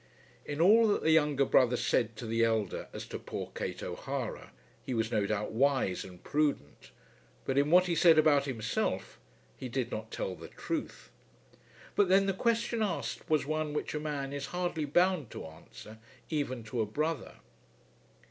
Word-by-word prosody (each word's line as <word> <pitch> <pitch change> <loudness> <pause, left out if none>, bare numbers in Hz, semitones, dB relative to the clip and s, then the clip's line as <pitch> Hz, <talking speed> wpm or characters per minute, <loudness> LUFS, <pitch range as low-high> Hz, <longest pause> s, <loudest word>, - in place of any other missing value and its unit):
In 145 - -5
all 220 +7 +6
that 205 - +1
the 160 - +4
younger 150 -3 +3
brother 125 -2 +4
said 115 -1 +1
to 115 - -7
the 115 +1 +1
elder 110 -4 0
as - - -7
to - - -6
poor - - -6
Kate - - -4
O'Hara - - -5 0.3
he 130 - -3
was 115 0 0
no 105 -3 +1
doubt 105 0 -2
wise 130 -6 +1
and 90 -2 -13
prudent; 145 - -1 0.6
but 135 - -1
in 140 +1 +3
what 180 +2 +6
he 175 - 0
said 165 -1 +6
about 150 -3 +5
himself 120 -6 -2 0.4
he 130 - -6
did 120 -1 -2
not 110 +1 -5
tell 95 - -3
the - - -10
truth. - - -5 0.8
But 200 -3 +3
then 195 +1 +5
the 195 - +1
question 230 +2 0
asked 210 -4 -3
was 155 -2 +2
one 155 0 -2
which 150 - -3
a 150 - -2
man 145 -2 -3
is 140 -1 -4
hardly 175 -3 -2
bound 175 - +2
to - - -7
answer, 95 +7 -12 0.3
even 130 -6 -2
to 110 +2 -3
a 110 - -1
brother. 155 +5 -2
140 Hz, 175 wpm, -31 LUFS, 115-160 Hz, 0.8 s, all